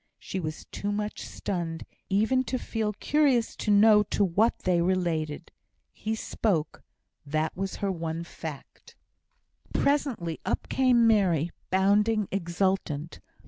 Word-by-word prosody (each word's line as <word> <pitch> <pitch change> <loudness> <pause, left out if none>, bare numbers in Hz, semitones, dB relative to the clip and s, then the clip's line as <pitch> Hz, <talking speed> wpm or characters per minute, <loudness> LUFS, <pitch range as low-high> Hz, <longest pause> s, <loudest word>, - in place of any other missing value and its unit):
She 190 - -5
was 155 -2 -5
too 205 - -3
much 210 +1 -3
stunned 170 -4 -4 0.2
even 220 +7 +2
to 255 - -1
feel 225 -3 -2
curious 265 0 +2
to - - -3
know 210 +1 +7
to 210 - 0
what 205 +6 +2
they 175 -2 +2
related. 170 -3 -1 0.4
He 220 +1 -3
spoke. 190 -7 -1 0.4
That 155 +2 -1
was 195 +1 -3
her 195 - +1
one 165 -1 -3
fact. 160 -3 -9 0.8
Presently 260 - 0
up - - -2
came 250 -3 +4
Mary, 180 -8 +3 0.2
bounding, 205 +2 +3
exultant. 175 -4 -1
195 Hz, 125 wpm, -27 LUFS, 170-220 Hz, 0.8 s, know